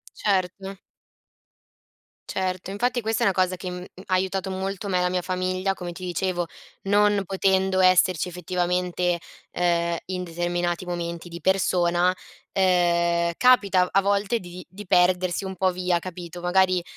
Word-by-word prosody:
Certo. 195 0 -1 1.5
Certo, 185 0 -3
infatti 245 +5 0
questa 225 -1 -1
è - - +3
una 195 - +4
cosa 185 -1 +1
che, 180 0 -6
mhmm, 180 0 -6 0.2
ha 185 - 0
aiutato 190 +1 -1
molto 190 +1 -4
me 185 -2 +1
e - - +1
la 180 - +2
mia 180 0 -1
famiglia 185 +1 -1
come 175 -2 -6
ti 185 +1 -9
dicevo. 175 0 -1 0.4
Non 205 0 +3
potendo 190 0 +1
esserci 185 -2 +4
effettivamente, 180 0 -1 0.3
ehm, 170 -1 +1
in 180 -1 -3
determinati 175 +1 -2
momenti 170 -1 -5
di 170 - -8
persona, 180 0 +2 0.4
ehm, 170 -2 +2
capita 200 -8 +4
a 195 - +3
volte 200 +3 +1
di 180 0 -10
di 205 +2 -10
perdersi 180 0 +2
un 190 0 -6
po' 185 +1 +2
via, 180 -1 0
capito; 175 -1 -8
magari, 185 0 +3
185 Hz, 150 wpm, -24 LUFS, 175-190 Hz, 1.5 s, una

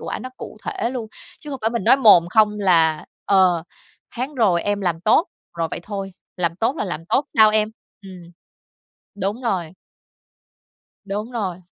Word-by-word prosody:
quả - - -5
nó 255 - -8
cụ - - -9
thể 235 - -2
luôn, 245 -4 -5 0.3
chứ 300 - -9
không 270 - -5
phải 225 - 0
mình 235 -5 -3
nói - - +6
mồm 210 -10 +6
không 215 +2 +5
là, 165 -5 +3 0.2
ờ, 185 -4 +3 0.5
"tháng 260 +5 -4
rồi 195 -9 +2
em 205 0 -1
làm 175 -4 -1
tốt", 215 - +3 0.3
rồi 165 -1 0
vậy - - -5
thôi. 195 -1 -6 0.2
"Làm 170 -1 -1
tốt 230 +8 0
là 215 - -2
làm 165 -3 -5
tốt 280 - +1
sao 220 -1 +7
em?" 215 0 +2 0.3
ừm. 180 -3 -12 0.9
Đúng 205 +6 -2
rồi. 185 -9 -2 1.3
Đúng 210 +4 -4
rồi. 190 -6 -4
200 Hz, 175 wpm, -21 LUFS, 175-225 Hz, 1.3 s, sao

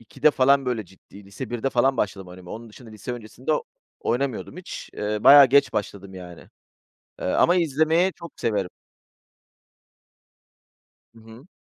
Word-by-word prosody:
2'de 135 +6 +1
falan 135 0 +3
böyle 115 -4 -2
ciddi, 95 +2 -17
lise 100 +7 -7
1'de 120 +3 -2
falan 130 +2 +2
başladım 95 -2 -3
oynamaya. 90 0 -12
Onun 115 +1 -10
dışında 115 +1 -14
lise 110 +3 -7
öncesinde 120 +5 -5 0.5
oynamıyordum 130 +5 -2
hiç. 180 - -9
Iıı, 105 0 -3
bayağı 140 -1 +10
geç 140 +2 +3
başladım 100 -2 -5
yani. 90 -2 -11 0.7
Iıı, - - -1
ama 175 - +4
izlemeyi 165 +3 +2
çok 170 -2 -12
severim. 100 -5 -1 2.5
Hı - - -16
hı. 115 +7 -15
120 Hz, 140 wpm, -24 LUFS, 105-140 Hz, 2.5 s, bayağı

